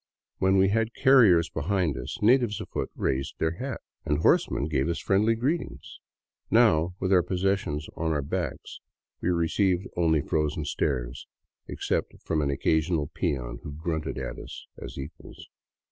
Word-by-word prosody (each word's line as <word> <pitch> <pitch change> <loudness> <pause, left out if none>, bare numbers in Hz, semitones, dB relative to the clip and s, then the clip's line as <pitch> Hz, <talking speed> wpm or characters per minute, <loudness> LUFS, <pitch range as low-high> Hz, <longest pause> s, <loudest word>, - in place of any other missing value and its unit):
When 95 +1 +3
we 95 0 +4
had 115 +2 0
carriers 115 - +6
behind 85 -1 0
us, - - -6
natives 120 -2 +4
afoot - - -4
raised 65 +1 -1
their 80 - 0
hats 130 0 -5 0.2
and 75 - 0
horsemen 75 -1 +2
gave 75 0 0
us 85 - -1
friendly 105 +3 +2
greetings. 120 - -3 0.5
Now, 80 +3 +4
with 95 0 +1
our 90 - +6
pos 90 +1 -3
sessions 95 -7 0
on 80 0 -1
our 75 - +1
own 70 - -3
backs, - - -4 0.4
we - - 0
received 90 +2 +1
only 80 -3 +2
frozen 75 0 -1
stares, 65 -3 -2 0.4
except - - -2
from 80 -2 0
an 70 - 0
occasional 80 +2 0
peon 65 -9 -2
who 75 - -7
grunted 80 -1 -3
at - - -5
us - - -9 0.2
as - - -8
equals. 70 +4 -9
85 Hz, 160 wpm, -27 LUFS, 75-95 Hz, 0.5 s, carriers